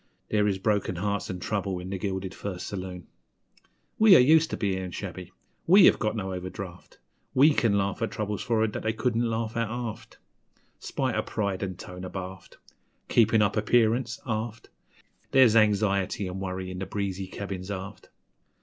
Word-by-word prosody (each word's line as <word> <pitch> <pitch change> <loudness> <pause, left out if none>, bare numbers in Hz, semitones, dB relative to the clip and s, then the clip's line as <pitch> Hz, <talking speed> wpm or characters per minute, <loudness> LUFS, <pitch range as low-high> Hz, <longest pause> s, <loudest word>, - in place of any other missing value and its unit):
There 105 -1 +3
is 100 -2 0
broken 100 -2 0
hearts 100 +3 -2
an' 90 - -4
trouble 100 -1 -2
in 90 +1 -7
the 95 - -3
gilded 95 -1 -3
first 90 -3 -6
saloon! 90 -3 -6 0.9
We 215 -3 +8
are - - +8
used 155 +5 +5
to - - -3
bein' 95 -3 -1
shabby 90 -1 -7 0.4
we 190 +2 +8
have - - +5
got 110 -1 -1
no 95 -3 -3
overdraft 90 0 -8 0.4
We 145 +4 +6
can 110 -7 +2
laugh 100 +1 -1
at 115 - 0
troubles 105 -1 -3
for'ard 110 -2 +1
that - - -4
they 110 - -1
couldn't 115 0 0
laugh 110 0 -2
at 115 -2 -1
aft; 120 -2 -6 0.6
Spite - - -2
o' - - +1
pride 100 -3 -2
an' 95 -2 -3
tone 90 +1 -9
abaft 95 0 -8 0.5
(Keepin' 110 -1 +4
up 105 - +1
appearance, 115 +2 +2
aft) 110 0 -4 0.6
There's 130 -4 +5
anxiety 100 -2 +2
an' 90 +1 -5
worry 95 -1 -4
in 90 - -6
the 95 - -4
breezy 95 -1 -3
cabins 95 -1 -6
aft. 95 -1 -7
100 Hz, 170 wpm, -27 LUFS, 95-110 Hz, 0.9 s, We